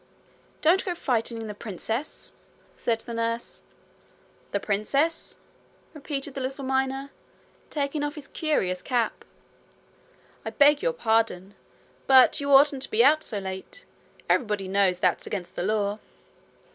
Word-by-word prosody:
'Don't 345 Hz, +5 st, +4 dB
go 360 Hz, -2 st, -3 dB
frightening 230 Hz, -5 st, -1 dB
the 210 Hz, -, -5 dB
princess,' 225 Hz, -, -5 dB, 0.4 s
said 230 Hz, -1 st, -1 dB
the 235 Hz, -, -8 dB
nurse. 230 Hz, 0 st, -3 dB, 0.9 s
'The 200 Hz, -, -1 dB
princess!' 275 Hz, +12 st, -1 dB, 0.6 s
repeated 285 Hz, -2 st, -5 dB
the 270 Hz, -, -5 dB
little 270 Hz, +1 st, -4 dB
miner, 265 Hz, +1 st, -1 dB, 0.6 s
taking 290 Hz, 0 st, -2 dB
off 290 Hz, 0 st, -3 dB
his 300 Hz, -3 st, -8 dB
curious 185 Hz, -, -1 dB
cap. 240 Hz, 0 st, -1 dB, 1.2 s
'I -, -, -3 dB
beg 290 Hz, 0 st, +5 dB
your -, -, +1 dB
pardon; 220 Hz, -, 0 dB, 0.5 s
but 265 Hz, +2 st, +6 dB
you 280 Hz, 0 st, -1 dB
oughtn't 275 Hz, 0 st, +6 dB
to -, -, -4 dB
be 225 Hz, +2 st, +4 dB
out 305 Hz, +4 st, +5 dB
so 215 Hz, -, -4 dB
late. 190 Hz, -, -7 dB, 0.4 s
Everybody 210 Hz, -5 st, +1 dB
knows 190 Hz, -1 st, +2 dB
that's -, -, 0 dB
against 185 Hz, -3 st, -5 dB
the -, -, -4 dB
law.' 205 Hz, +1 st, 0 dB
250 Hz, 135 wpm, -26 LUFS, 210-285 Hz, 1.2 s, but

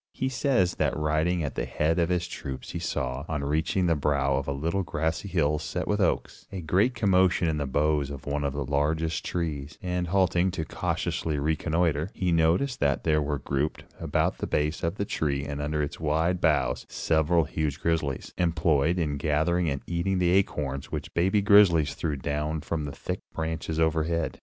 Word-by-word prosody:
He 130 Hz, -, -1 dB
says 130 Hz, -9 st, +1 dB
that -, -, 0 dB
riding 80 Hz, +3 st, +1 dB
at 70 Hz, -, -3 dB
the -, -, -2 dB
head 80 Hz, +3 st, 0 dB
of 85 Hz, 0 st, +2 dB
his 90 Hz, -1 st, 0 dB
troops 65 Hz, -6 st, -6 dB
he 85 Hz, -, -4 dB
saw, 70 Hz, -5 st, -2 dB
on 75 Hz, -3 st, -2 dB
reaching 80 Hz, +6 st, 0 dB
the 85 Hz, -, +3 dB
brow 70 Hz, -2 st, +1 dB
of 70 Hz, +1 st, -2 dB
a -, -, 0 dB
little 80 Hz, +8 st, -1 dB
grassy 80 Hz, +2 st, -2 dB
hill 75 Hz, -5 st, +1 dB
set -, -, -4 dB
with -, -, +1 dB
oaks, -, -, -1 dB
a 95 Hz, -, -5 dB
great 95 Hz, +10 st, +2 dB
commotion 95 Hz, -4 st, +3 dB
in 80 Hz, -1 st, 0 dB
the 70 Hz, -2 st, -2 dB
boughs 75 Hz, +1 st, +1 dB
of 70 Hz, -1 st, -8 dB
one 75 Hz, 0 st, -1 dB
of 70 Hz, -1 st, -1 dB
the 70 Hz, -1 st, -3 dB
largest 80 Hz, +4 st, 0 dB
trees, 80 Hz, -4 st, -3 dB
and, 90 Hz, -3 st, -2 dB
halting 90 Hz, 0 st, +2 dB
to 85 Hz, -3 st, -3 dB
cautiously 75 Hz, 0 st, -2 dB
reconnoiter, 80 Hz, +2 st, 0 dB
he 90 Hz, -2 st, 0 dB
noticed 85 Hz, +11 st, +2 dB
that 70 Hz, -1 st, +1 dB
there 75 Hz, -2 st, +2 dB
were 75 Hz, 0 st, -1 dB
grouped 70 Hz, +2 st, -2 dB, 0.2 s
about -, -, 0 dB
the -, -, -2 dB
base 75 Hz, +2 st, 0 dB
of 85 Hz, +3 st, -1 dB
the 100 Hz, -, -2 dB
tree 70 Hz, -6 st, -1 dB
and 70 Hz, 0 st, -4 dB
under 75 Hz, +1 st, -1 dB
its 75 Hz, -, -5 dB
wide 80 Hz, +3 st, +1 dB
boughs, 80 Hz, -3 st, +1 dB
several 80 Hz, +1 st, +2 dB
huge 75 Hz, 0 st, -2 dB
grizzlies, 80 Hz, -6 st, -1 dB
employed 80 Hz, -2 st, +2 dB
in 75 Hz, -5 st, -1 dB
gathering 80 Hz, +4 st, +1 dB
and 70 Hz, -1 st, -2 dB
eating 90 Hz, +3 st, -1 dB
the 90 Hz, -1 st, +2 dB
acorns 70 Hz, -8 st, 0 dB
which -, -, -4 dB
the 85 Hz, -, +1 dB
baby 95 Hz, +3 st, +2 dB
grizzlies 90 Hz, -8 st, +5 dB
threw 75 Hz, +1 st, -2 dB
down 75 Hz, +3 st, -2 dB
from 80 Hz, 0 st, -3 dB
the 70 Hz, -, -4 dB
thick -, -, -4 dB, 0.2 s
branches 80 Hz, 0 st, -3 dB
overhead. 80 Hz, +1 st, 0 dB
80 Hz, 195 wpm, -27 LUFS, 75-85 Hz, 0.2 s, grizzlies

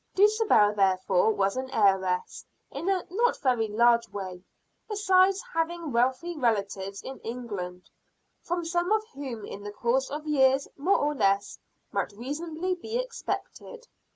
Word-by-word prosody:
Dulcibel 415 Hz, -, +4 dB
therefore 190 Hz, 0 st, +3 dB
was 195 Hz, -2 st, 0 dB
an 260 Hz, 0 st, -3 dB
heiress, 190 Hz, -6 st, +1 dB, 0.3 s
in 355 Hz, -, -3 dB
a 380 Hz, -2 st, 0 dB
not 470 Hz, +5 st, +2 dB
very 245 Hz, -5 st, +1 dB
large 235 Hz, +2 st, +3 dB
way, 185 Hz, -3 st, -7 dB, 0.5 s
besides 390 Hz, -1 st, +3 dB
having 330 Hz, -1 st, -2 dB
wealthy 260 Hz, +9 st, +1 dB
relatives 200 Hz, -6 st, -1 dB
in 265 Hz, -, -8 dB
England, 200 Hz, -7 st, -6 dB, 0.5 s
from 345 Hz, 0 st, -3 dB
some 350 Hz, +3 st, 0 dB
of 435 Hz, 0 st, +2 dB
whom 255 Hz, -7 st, -6 dB
in 200 Hz, -, -8 dB
the 205 Hz, 0 st, -6 dB
course 245 Hz, +5 st, 0 dB
of 300 Hz, +2 st, -5 dB
years 270 Hz, -2 st, +3 dB
more 360 Hz, +8 st, +2 dB
or 295 Hz, +1 st, 0 dB
less 200 Hz, -6 st, +1 dB, 0.3 s
might -, -, -2 dB
reasonably 315 Hz, -, -3 dB
be 440 Hz, +6 st, -4 dB
expected. -, -, -5 dB
265 Hz, 140 wpm, -27 LUFS, -, 0.5 s, Dulcibel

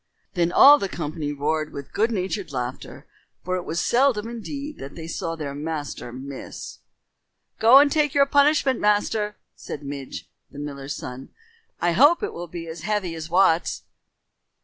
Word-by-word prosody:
Then 175 Hz, -2 st, +1 dB
all 290 Hz, +9 st, +8 dB
the 195 Hz, -, -2 dB
company 155 Hz, -3 st, -4 dB
roared 155 Hz, +2 st, -1 dB
with 140 Hz, -1 st, -9 dB
good 220 Hz, +3 st, +2 dB
natured 190 Hz, -4 st, -3 dB
laughter, 125 Hz, -1 st, -5 dB, 0.4 s
for 185 Hz, +1 st, -1 dB
it 180 Hz, -, -5 dB
was 165 Hz, -, -2 dB
seldom 240 Hz, -4 st, +2 dB
indeed 280 Hz, +6 st, -6 dB
that 135 Hz, +1 st, -8 dB
they 165 Hz, -, -7 dB
saw 165 Hz, 0 st, -4 dB
their 150 Hz, -3 st, -5 dB
master 145 Hz, -4 st, -5 dB
miss. 130 Hz, +2 st, -8 dB, 0.8 s
"Go 230 Hz, +4 st, +8 dB
and 285 Hz, +1 st, +6 dB
take 295 Hz, -2 st, +1 dB
your 280 Hz, -1 st, +6 dB
punishment, 285 Hz, -2 st, +3 dB
master," 210 Hz, 0 st, +1 dB, 0.2 s
said 145 Hz, -, -8 dB
Midge, 140 Hz, -1 st, -7 dB, 0.2 s
the -, -, -14 dB
miller's 140 Hz, -1 st, -5 dB
son. 125 Hz, +1 st, -8 dB, 0.5 s
"I 175 Hz, -, +2 dB
hope 290 Hz, -, +5 dB
it -, -, -2 dB
will 175 Hz, +1 st, -6 dB
be 170 Hz, 0 st, -7 dB
as 160 Hz, 0 st, -8 dB
heavy 205 Hz, -2 st, -1 dB
as 160 Hz, 0 st, -7 dB
Wat's." 175 Hz, -1 st, +2 dB
175 Hz, 165 wpm, -24 LUFS, 145-225 Hz, 0.8 s, all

